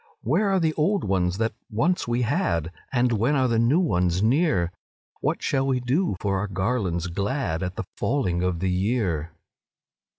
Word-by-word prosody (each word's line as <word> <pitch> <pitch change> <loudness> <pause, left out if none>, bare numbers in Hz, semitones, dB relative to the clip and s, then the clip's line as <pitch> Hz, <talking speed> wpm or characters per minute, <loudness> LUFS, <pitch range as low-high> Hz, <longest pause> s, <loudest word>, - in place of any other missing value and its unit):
Where 180 - +2
are 190 -1 +2
the 160 -2 +1
old 185 +7 +1
ones 95 -2 0
that 115 +1 0 0.2
once 155 +12 0
we 120 +1 +1
had, 85 -7 0 0.2
And 125 -1 +2
when 120 +6 +2
are 130 -2 +3
the 115 -2 +1
new 120 +9 +3
ones 90 - +1
near? 115 - +2 0.5
What - - -1
shall 135 -1 +1
we 130 -2 +1
do 130 - 0
for 100 -2 0
our 105 - -2
garlands 95 -3 -1
glad 100 - -2
At 90 -1 -3
the - - -3
falling 105 -11 0
of 90 -2 -1
the 95 -1 +1
year?" 90 -5 0
115 Hz, 175 wpm, -25 LUFS, 90-135 Hz, 0.5 s, are